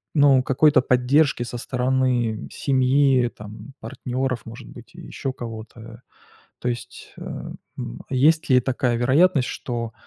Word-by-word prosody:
ну 140 -3 +5
какой-то 140 +1 +4
поддержки 130 +1 +2
со 120 0 -6
стороны 125 -3 0
семьи, 130 -2 +2
там 105 +6 -11
партнеров, 125 +2 -3
может 115 +2 -10
быть, 120 -1 -14
еще 135 - -5
кого-то? 115 -1 -9 0.6
То 125 - -3
есть, 120 +1 -7
а, - - -7 0.3
м, - - -6
есть 155 +5 +3
ли 125 -1 +5
такая 125 -1 -1
вероятность, 135 +4 +3
что, 115 -2 -5
125 Hz, 125 wpm, -23 LUFS, 120-135 Hz, 0.6 s, ну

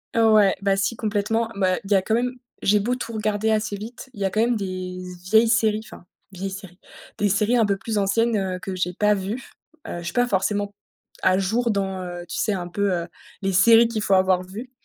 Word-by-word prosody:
Heu, 225 -1 +5
ouais, 205 -3 +5
bah, 195 -1 +2
si 195 +3 0
complètement. 220 +1 -1
Bah 185 -2 +1
il 195 - -10
y - - +6
a 190 - +4
quand 220 +4 0
même 250 +1 0 0.3
j'ai 210 +1 +3
beau 245 +5 0
tout 230 -2 -6
regarder 215 0 0
assez 215 -1 0
vite, 235 +5 -9
il - - -12
y 195 - 0
a 195 - +2
quand 215 +3 0
même 240 +1 +2
des 185 -2 -5
z 180 0 -10
vieilles 220 +1 +6
séries, 220 -1 +2
enfin 195 - -13 0.3
vieilles 195 +1 -5
séries, 190 -2 -10 0.4
des 205 -1 +1
séries 210 +5 +2
un 225 - +4
peu 200 -1 0
plus 220 +1 -3
anciennes, 220 +3 +2
heu, 185 -2 -2
que 190 0 -5
j'ai 180 -1 -1
pas 210 +3 +3
vues. 205 +6 -4 0.4
Heu, 175 - -5
je - - -8
suis 170 - -4
pas 245 0 +2
forcément 205 0 0 0.5
à 185 - +3
jour 225 +5 +1
dans, 190 -2 -2
heu, 175 -1 -6
tu - - -5
sais 210 - +1
un 180 -2 -4
peu, 200 +2 0
heu, 170 -1 -2 0.3
les 195 0 -1
séries 225 +5 +6
qu'il 225 -2 -3
faut 195 - +1
avoir 185 -1 +3
vues, 220 +8 -9
200 Hz, 240 wpm, -23 LUFS, 190-220 Hz, 0.5 s, y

